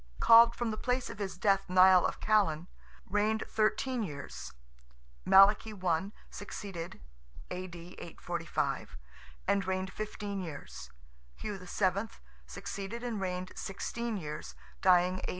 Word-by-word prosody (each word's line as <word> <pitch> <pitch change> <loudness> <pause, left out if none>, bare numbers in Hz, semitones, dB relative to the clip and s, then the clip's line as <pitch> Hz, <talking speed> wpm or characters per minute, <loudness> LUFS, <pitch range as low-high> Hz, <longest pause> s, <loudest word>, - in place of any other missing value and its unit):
(called 230 +1 +8
from 240 -2 -1
the 215 - -4
place 250 0 -1
of - - -11
his 195 -3 -4
death 195 0 +2
Nial 185 0 +6
of - - -6
Callan), 195 -7 +2 0.4
reigned 210 +2 +1
thirteen 235 +3 0
years; 140 - -6 0.7
Malachy 205 +3 +6
I. 185 0 0 0.2
succeeded 190 - -7 0.5
(A.D. 180 -1 -5 0.2
845), 170 - -3 0.5
and 200 0 +2
reigned 190 0 -2
fifteen 205 -1 -4
years; 170 -5 -8 0.5
Hugh 205 -2 -5
VII. 190 +3 0 0.4
succeeded 200 +5 -6
and 230 -5 -3
reigned 185 -1 -3
sixteen 230 +3 -4
years 150 -4 -6 0.3
(dying 185 0 +4
A. - - -4
195 Hz, 120 wpm, -31 LUFS, 180-215 Hz, 0.7 s, called